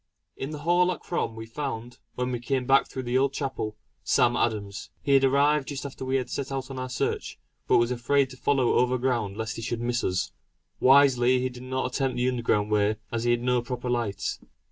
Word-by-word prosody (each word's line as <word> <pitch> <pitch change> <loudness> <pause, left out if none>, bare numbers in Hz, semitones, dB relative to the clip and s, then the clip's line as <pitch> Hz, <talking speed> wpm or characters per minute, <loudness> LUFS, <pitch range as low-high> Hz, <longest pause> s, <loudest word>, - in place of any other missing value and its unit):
In 135 - -5
the 155 - -5
hall 180 +1 +4
at 180 - -5
Crom, 145 -9 -2
we 110 0 -7
found, 120 0 -5 0.2
when 125 0 -1
we 120 - -2
came 130 +1 -1
back 135 +2 +4
through 130 - -5
the 125 +1 +1
old 140 0 +1
chapel, 130 -7 -3 0.3
Sam 120 0 +3
Adams. 100 -4 -2
He 140 - +2
had 135 0 +5
arrived 140 +1 +3
just 140 -1 -5
after 135 -1 -7
we 130 +1 -1
had 130 -2 0
set 140 +2 -4
out 135 0 -4
on 130 - -5
our 130 0 -4
search, 125 - -2 0.3
but - - +5
was 120 +1 +2
afraid 130 +3 +1
to - - -9
follow 130 -1 +2
over 125 +1 +3
ground 120 -6 -1
lest 110 0 -3
he - - -5
should 115 +1 -3
miss 120 0 -1
us; 90 0 -1 0.5
wisely 130 -2 +5
he 130 +1 -1
did 125 -1 -11
not 130 +1 -2
attempt 135 -3 0
the 125 +1 +1
underground 115 -4 0
way 105 0 +2 0.2
as 115 0 -2
he - - +2
had 120 0 +2
no 125 -1 +2
proper 125 +1 -4
light. 105 -4 -2
125 Hz, 225 wpm, -26 LUFS, 120-135 Hz, 0.5 s, had